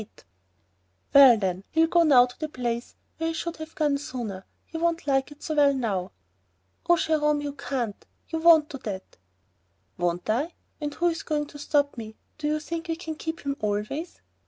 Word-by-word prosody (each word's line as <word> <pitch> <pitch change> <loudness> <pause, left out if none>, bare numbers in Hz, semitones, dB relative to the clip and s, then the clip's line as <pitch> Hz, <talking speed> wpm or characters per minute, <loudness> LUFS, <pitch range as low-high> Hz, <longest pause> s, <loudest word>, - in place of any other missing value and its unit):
"Eight." 210 - -15 0.9
"Well 270 -4 +9
then, 190 -2 -2
he'll 325 0 +4
go 340 +1 +3
now 275 -7 +7
to 245 - -13
the 310 -1 -3
place 240 -4 -3 0.2
where 325 - 0
he - - -2
should 340 +1 -4
have 315 0 -9
gone 295 -3 +1
sooner, 240 -8 -5
and 190 - -14 0.2
he 325 - -7
won't 335 -1 0
like 270 0 +1
it 295 - -13
so 315 - -2
well 285 -2 +4
now." 195 -7 -2 0.8
"Oh, 345 - +6
Jerome, 300 -2 +2
you 290 -1 -4
can't... 255 -6 -4 0.2
you 325 - -3
won't 320 -2 +6
do 275 - -7
that!" 195 -5 -7 0.8
"Won't 175 0 -1
I? 275 +11 0 0.3
and 295 -1 -2
who's 340 -1 0
going 300 -1 -1
to 290 - -11
stop 285 -2 +1
me? 220 -1 -8 0.2
Do 300 - -1
you 305 0 +1
think 335 +2 -5
we 330 - -1
can 320 -1 -6
keep 320 +1 -5
him 280 -1 -2
always?" 215 - -3
290 Hz, 195 wpm, -26 LUFS, 240-320 Hz, 0.9 s, Well